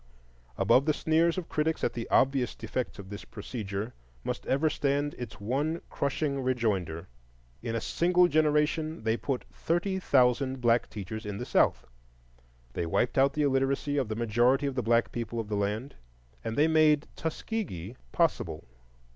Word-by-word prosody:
Above 135 +4 +4
the 155 - +3
sneers 165 +2 +2
of 180 -3 -3
critics 155 +1 -1
at - - +1
the 115 -1 -5
obvious 130 -2 +2
defects 130 - -4
of 100 -1 -10
this 100 - -7
procedure 105 0 -5 0.3
must - - -4
ever 140 +4 +2
stand 145 -1 0
its 125 - -7
one 140 +10 -1
crushing 140 0 -1
rejoinder: 105 -10 -1 0.5
in 115 -1 -3
a - - +1
single 175 +8 +3
generation 155 -2 +1
they 110 0 +2
put 130 +1 -2
thirty 180 +3 -1
thousand 130 -3 +2
black 120 -1 +2
teachers 110 +2 -6
in 105 -2 -5
the - - -4
South; - - +2 0.9
they 85 - -2
wiped 120 +8 +1
out 135 +1 +4
the 150 - 0
illiteracy 135 +1 +1
of 130 -6 0
the 110 - -2
majority 120 +5 +2
of 140 - -1
the 130 - -1
black 115 0 +2
people 115 0 -4
of 110 -2 -4
the 105 - -1
land, 105 +7 -2 0.5
and 115 - -3
they 150 +2 +5
made 155 -2 +4
Tuskegee 160 - -4 0.2
possible. - - 0
130 Hz, 165 wpm, -29 LUFS, 115-150 Hz, 0.9 s, they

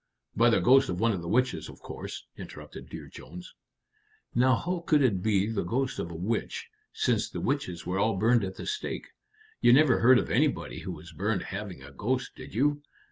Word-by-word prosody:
"By 115 +1 +5
the 115 - +4
ghost 135 +2 +5
of 90 -1 -2
one 115 +2 +3
of 95 -5 -2
the 85 - -7
witches, 125 +6 +1
of - - -12
course?" - - -7
interrupted - - -10
Dear - - -8
Jones. 85 +8 -11 0.8
"Now 130 +1 +4
how 180 +8 -2
could 155 -4 +3
it 100 -8 +2
be 100 -1 +2
the 110 -2 -1
ghost 130 +9 -1
of 85 - -3
a 85 - -8
witch, 115 - -2 0.2
since 435 -1 0
the - - -5
witches 115 -12 -2
were 90 +2 -1
all 105 -1 +2
burned 115 +3 +3
at 95 -1 -4
the - - -7
stake? 425 0 -4 0.5
You 120 - +6
never 135 -2 +5
heard 125 +2 +7
of - - -1
anybody - - +1
who - - -5
was 80 +3 -10
burned 100 +4 -1
having 95 -8 -6
a 70 - -11
ghost, 70 - -2
did - - -10
you?" 145 +4 +2
115 Hz, 205 wpm, -28 LUFS, 90-130 Hz, 0.8 s, heard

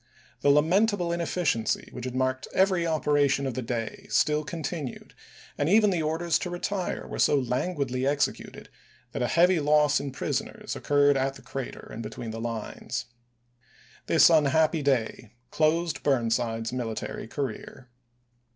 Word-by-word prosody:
The 145 - +2
lamentable 175 +5 +3
inefficiency 170 - -1
which 125 - -7
had 130 0 -5
marked 130 0 -1
every 185 -3 +3
operation 145 -3 +2
of 135 - -2
the 130 - -3
day 115 -2 -4
still 150 +1 +2
continued, 155 -4 -6 0.5
and 145 - +1
even 210 +1 +5
the 175 -3 0
orders 160 +2 0
to 180 - -4
retire 180 +2 -3
were - - -7
so 145 - +4
languidly 130 0 -1
executed 145 0 -2 0.4
that - - -4
a 120 - +1
heavy 175 +3 +4
loss 150 -1 +3
in 140 - -5
prisoners 135 - -4
occurred 145 -1 +3
at 135 0 -1
the 130 - -14
crater 135 -2 -6
and 115 - -6
between 115 +1 -6
the 115 +1 -6
lines.1 115 -2 -4 1.0
This - - +6
unhappy 160 +1 +3
day 120 -5 -1 0.2
closed 160 +1 +1
Burnside's 115 -3 0
military 115 -3 -4
career. 125 0 -6
145 Hz, 140 wpm, -27 LUFS, 125-165 Hz, 1.0 s, This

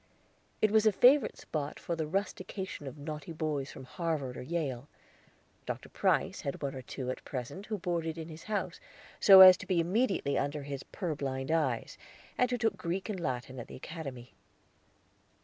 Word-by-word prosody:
It 215 - +5
was 220 0 +5
a - - +6
favorite 255 +7 +5
spot 145 -2 -4
for 170 - -3
the 160 -2 -2
rustication 190 -2 -4
of 135 - -7
naughty 150 +1 -6
boys 150 -3 -2
from - - -10
Harvard 145 -2 -3
or - - -6
Yale. 140 -3 -3 0.8
Dr. - - -5
Price - - +1
had 140 - -4
one 140 - -2
or 130 - -6
two 130 0 -4
at - - -7
present 135 - -6
who 215 - -2
boarded 170 -3 -2
in 160 -1 -6
his 160 0 -10
house 200 -5 -2 0.4
so 195 -2 +10
as 185 -1 +11
to - - -10
be 185 -3 +2
immediately 190 - +1
under 145 0 -2
his 140 -1 -5
purblind 140 -6 -3
eyes, 135 -8 0 0.4
and 250 - +2
who 250 - 0
took 220 -4 0
Greek 185 +5 -3
and 200 -3 -3
Latin 130 -4 -3
at 120 - -7
the - - -10
Academy. 135 -5 -8
160 Hz, 180 wpm, -31 LUFS, 135-190 Hz, 0.8 s, as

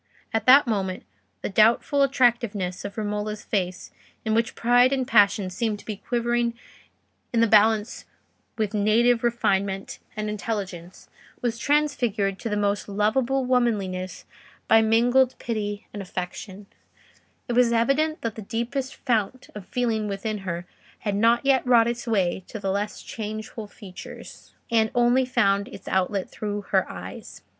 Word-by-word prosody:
At 225 0 -1
that 275 +3 +8
moment 195 -5 -2 0.4
the - - -1
doubtful 225 +7 +3
attractiveness 235 -8 +1
of 200 +1 -7
Romola's 210 0 -3
face, 185 -3 -3 0.3
in 220 - +1
which 230 +1 +1
pride 245 +2 +4
and 260 -2 0
passion 205 -5 +4
seemed 215 +2 -1
to - - -16
be 215 -2 -5
quivering 240 +1 -1 0.8
in 235 - +1
the 230 - +5
balance 220 0 +3 0.5
with 215 -2 -1
native 230 +3 +3
refinement 195 -5 0 0.2
and 215 0 -2
intelligence, 195 -4 -5 0.4
was 235 -1 -1
transfigured 240 -10 +1
to 230 - -4
the 210 - -1
most 205 -1 -1
lovable 240 +6 +1
womanliness 205 -8 -1 0.4
by 225 0 +6
mingled 245 +4 +3
pity 210 -2 -4
and 205 - -5
affection: 190 +2 -6 0.8
it 240 - -2
was 240 -1 +4
evident 275 +7 +1
that 230 -2 -2
the 220 - -8
deepest 235 +5 -3
fount 240 0 -1
of 205 -3 -9
feeling 225 -4 -1
within 205 +1 -3
her 175 -2 -4 0.4
had 205 - -1
not 230 +5 +3
yet 270 -2 +4
wrought 235 -2 +5
its 235 +1 -3
way 190 -4 0
to - - -7
the 195 -2 -2
less 205 +2 -3
changeful 215 0 -6
features, 190 -3 -12 0.2
and 220 -1 +3
only 245 +2 +4
found 200 -4 +2
its - - -12
outlet 190 +1 0
through 205 -1 -4
her 195 -1 0
eyes. 90 0 -9
220 Hz, 150 wpm, -25 LUFS, 200-240 Hz, 0.8 s, that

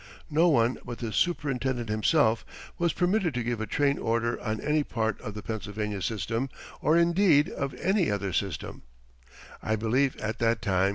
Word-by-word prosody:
No 160 +4 +4
one 125 -6 +3
but 120 -1 -6
the 115 -3 -4
superintendent 130 -8 0
himself 110 +1 +2 0.4
was 170 -1 +2
permitted 180 - +1
to 125 - -1
give 120 -1 -2
a 110 - -3
train 140 -1 +1
order 115 +1 0
on 110 -1 -2
any 150 +1 +1
part 110 -5 -2
of 105 -5 -6
the 105 - -6
Pennsylvania 105 -1 -4
system, 115 +5 -2 0.3
or 155 +2 +4
indeed 170 -3 +4
of 140 -1 -4
any 190 -1 +1
other 100 -2 -2
system, 100 +1 -3 0.8
I 110 - 0
believe, 125 +5 +1
at 110 +1 -4
that 115 -1 +2
time. 95 -3 +2
120 Hz, 170 wpm, -28 LUFS, 110-150 Hz, 0.8 s, No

